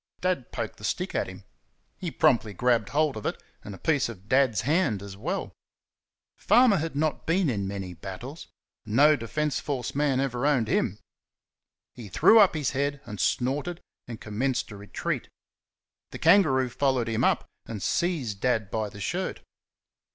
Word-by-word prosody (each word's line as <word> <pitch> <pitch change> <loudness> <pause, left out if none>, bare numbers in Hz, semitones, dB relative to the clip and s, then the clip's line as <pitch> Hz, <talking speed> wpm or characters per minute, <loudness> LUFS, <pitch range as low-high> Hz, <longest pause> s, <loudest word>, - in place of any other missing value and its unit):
Dad 180 -9 -1
poked - - -4
the - - -15
stick - - -2
at - - 0
him. - - -10 0.6
He - - -3
promptly 110 -4 +2
grabbed 120 -1 +2
hold 150 -1 +1
of 110 - -7
it, - - -3 0.2
and 100 - -8
a - - -11
piece 145 - +1
of 100 -4 -11
Dad's 130 -6 +3
hand 140 - +1
as 100 -1 -8
well. 100 - -4 0.8
Farmer 240 -5 +4
had 160 -1 -3
not 155 0 -1
been 165 -3 +2
in 100 -4 -2
many 95 -2 -5
battles 95 - -8 0.4
no 140 +8 +5
Defence 140 +4 -2
Force 130 -5 -3
man 140 -2 +1
ever 135 0 0
owned 130 -7 +2
him. 105 -2 0 1.0
He 115 -5 -10
threw 220 - +6
up 200 -5 +6
his 150 -4 0
head 140 +1 -1
and 105 -1 -8
snorted, 145 +7 0 0.3
and 115 -2 -7
commenced 120 +4 -2
a - - -8
retreat. 100 -2 -4 0.8
The - - -7
kangaroo 135 -10 +4
followed 130 -2 0
him 115 -1 0
up - - +2 0.2
and 105 -4 -6
seized 135 - -1
Dad 110 -5 0
by 110 -2 -1
the 105 - -12
shirt. - - -3
125 Hz, 165 wpm, -27 LUFS, 105-150 Hz, 1.0 s, threw